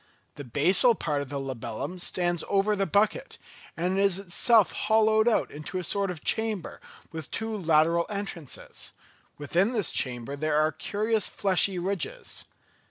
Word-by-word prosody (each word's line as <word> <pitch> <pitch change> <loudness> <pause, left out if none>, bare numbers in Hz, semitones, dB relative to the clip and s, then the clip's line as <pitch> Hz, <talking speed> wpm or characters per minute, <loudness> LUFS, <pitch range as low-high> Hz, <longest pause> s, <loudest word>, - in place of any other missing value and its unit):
The 145 - -9
basal 175 - +4
part 150 -7 -2
of 140 - -7
the 140 0 -4
labellum 130 +5 -5
stands 175 -1 0
over 200 +1 +2
the 195 -1 -1
bucket, 450 - 0 0.4
and 180 +3 0
is 195 -2 +3
itself 200 +3 +3
hollowed 220 +1 +2
out 235 - +1
into 150 +5 -6
a 180 - -3
sort 200 +3 0
of 170 -4 -6
chamber 220 -5 -2 0.3
with 160 -2 -7
two 225 0 -3
lateral 165 -2 +2
entrances; 195 - -6 0.4
within 175 - 0
this 215 -7 +1
chamber 125 +1 -2
there 150 +1 -1
are 155 +1 +2
curious 215 +4 0
fleshy 190 -1 +2
ridges. 185 0 -2
185 Hz, 150 wpm, -27 LUFS, 155-210 Hz, 0.4 s, basal